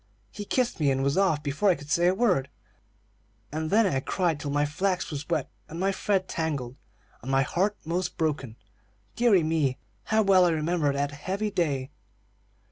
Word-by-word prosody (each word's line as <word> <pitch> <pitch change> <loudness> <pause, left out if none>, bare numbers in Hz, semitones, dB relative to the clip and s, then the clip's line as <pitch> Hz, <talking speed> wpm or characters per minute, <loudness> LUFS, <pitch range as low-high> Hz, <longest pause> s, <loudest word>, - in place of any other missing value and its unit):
"He 205 - -7
kissed 250 -1 0
me, 145 -3 +3
and 135 0 +1
was 140 +1 +1
off 185 -6 +2
before 155 +8 +1
I 180 - +4
could 145 -1 -11
say 175 +2 +3
a 185 - +3
word, 185 - +1 1.0
and 155 +1 -3
then 220 +4 +4
I 145 -9 +1
cried 165 +2 -1
till 145 - -4
my 145 +1 +1
flax 185 +5 -1
was 145 +1 -6
wet 160 -5 0 0.2
and 165 - -7
my 195 +2 +1
thread 195 -1 0
tangled, 140 -7 -3 0.5
and 125 - -7
my 135 0 +3
heart 195 +9 0
'most 175 +2 -2
broken. 145 -8 -2 0.6
Deary 225 -8 +4
me, 155 -5 0 0.3
how 220 0 +2
well 190 -2 +5
I - - +4
remember 160 -1 +1
that 140 +1 -1
heavy 190 +9 -3
day!" 145 -8 -1
160 Hz, 185 wpm, -27 LUFS, 145-190 Hz, 1.0 s, well